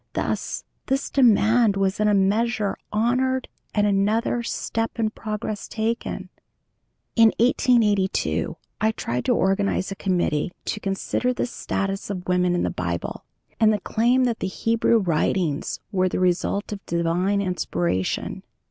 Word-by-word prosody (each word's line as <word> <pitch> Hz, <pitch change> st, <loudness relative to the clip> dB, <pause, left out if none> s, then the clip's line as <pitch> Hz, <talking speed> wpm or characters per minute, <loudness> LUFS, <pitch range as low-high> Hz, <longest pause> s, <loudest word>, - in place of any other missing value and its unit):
Thus -, -, -2 dB, 0.2 s
this 270 Hz, +1 st, -1 dB
demand 225 Hz, -4 st, +4 dB
was 195 Hz, 0 st, 0 dB
in 210 Hz, -, +3 dB
a 210 Hz, -, +4 dB
measure 210 Hz, +2 st, +1 dB, 0.2 s
honored 255 Hz, +4 st, +1 dB, 0.2 s
and 205 Hz, -1 st, +2 dB
another 210 Hz, +4 st, +1 dB
"step 225 Hz, 0 st, -3 dB
in 220 Hz, -2 st, 0 dB
progress" 215 Hz, -1 st, -4 dB
taken. 230 Hz, +1 st, -3 dB, 0.9 s
In 230 Hz, -1 st, +7 dB
1882 225 Hz, -5 st, +2 dB, 0.2 s
I 220 Hz, +1 st, +2 dB
tried 125 Hz, -, -3 dB
to -, -, +3 dB
organize 195 Hz, 0 st, +1 dB
a -, -, -3 dB
committee 175 Hz, -4 st, 0 dB
to -, -, -2 dB
consider 200 Hz, +5 st, -1 dB
the -, -, 0 dB
status 195 Hz, -5 st, -3 dB
of 185 Hz, -3 st, -5 dB
women 180 Hz, -1 st, +2 dB
in 175 Hz, -, 0 dB
the -, -, 0 dB
Bible, 85 Hz, -1 st, -4 dB, 0.3 s
and 220 Hz, -1 st, +5 dB
the 210 Hz, -, 0 dB
claim 240 Hz, +6 st, +2 dB
that 240 Hz, -3 st, 0 dB
the -, -, -1 dB
Hebrew 230 Hz, +4 st, +2 dB
Writings 170 Hz, -4 st, 0 dB
were 185 Hz, -2 st, +2 dB
the -, -, -2 dB
result 185 Hz, +3 st, 0 dB
of 200 Hz, -1 st, -6 dB
divine 170 Hz, +4 st, +1 dB
inspiration. 95 Hz, -, -1 dB
205 Hz, 140 wpm, -24 LUFS, 185-225 Hz, 0.9 s, In